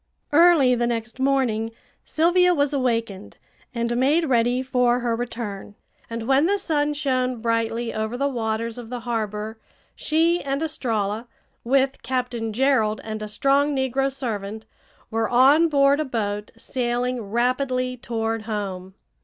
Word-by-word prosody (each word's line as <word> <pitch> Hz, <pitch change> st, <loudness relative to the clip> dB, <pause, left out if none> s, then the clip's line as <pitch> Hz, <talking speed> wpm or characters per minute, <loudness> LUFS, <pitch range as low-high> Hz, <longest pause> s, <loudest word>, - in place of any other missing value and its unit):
Early 310 Hz, -5 st, +6 dB
the 240 Hz, -1 st, +1 dB
next 235 Hz, +1 st, -3 dB
morning 260 Hz, -5 st, +1 dB, 0.4 s
Sylvia 355 Hz, +2 st, +3 dB
was 285 Hz, -1 st, +1 dB
awakened 230 Hz, -7 st, -2 dB, 0.3 s
and 235 Hz, -1 st, -2 dB
made 290 Hz, +7 st, +3 dB
ready 245 Hz, -2 st, +2 dB
for 250 Hz, -1 st, +2 dB
her 235 Hz, -1 st, 0 dB
return, 225 Hz, -4 st, -5 dB, 0.3 s
and 230 Hz, 0 st, -5 dB
when 275 Hz, +4 st, +4 dB
the 405 Hz, +2 st, +2 dB
sun 295 Hz, -6 st, 0 dB
shone 255 Hz, -4 st, 0 dB
brightly 230 Hz, 0 st, -1 dB
over 220 Hz, +2 st, -3 dB
the 280 Hz, +2 st, +1 dB
waters 230 Hz, -2 st, -2 dB
of 230 Hz, -2 st, -9 dB
the 245 Hz, -1 st, -5 dB
harbor 220 Hz, -2 st, -3 dB, 0.4 s
she 330 Hz, +3 st, +1 dB
and 275 Hz, +2 st, -2 dB
Estralla, 225 Hz, -7 st, -2 dB, 0.4 s
with 270 Hz, +2 st, +1 dB
Captain 250 Hz, -3 st, -2 dB
Gerald 225 Hz, -3 st, +2 dB
and 215 Hz, -1 st, -5 dB
a 215 Hz, -, -4 dB
strong 275 Hz, +6 st, +2 dB
negro 265 Hz, +1 st, 0 dB
servant, 220 Hz, -5 st, -5 dB, 0.5 s
were 225 Hz, 0 st, 0 dB
on 275 Hz, +7 st, +5 dB
board 280 Hz, -1 st, +4 dB
a 310 Hz, -, 0 dB
boat 210 Hz, -5 st, -3 dB
sailing 245 Hz, +1 st, -2 dB
rapidly 255 Hz, +2 st, 0 dB
toward 225 Hz, -2 st, -3 dB
home. 190 Hz, -3 st, -4 dB
245 Hz, 140 wpm, -23 LUFS, 225-275 Hz, 0.5 s, Early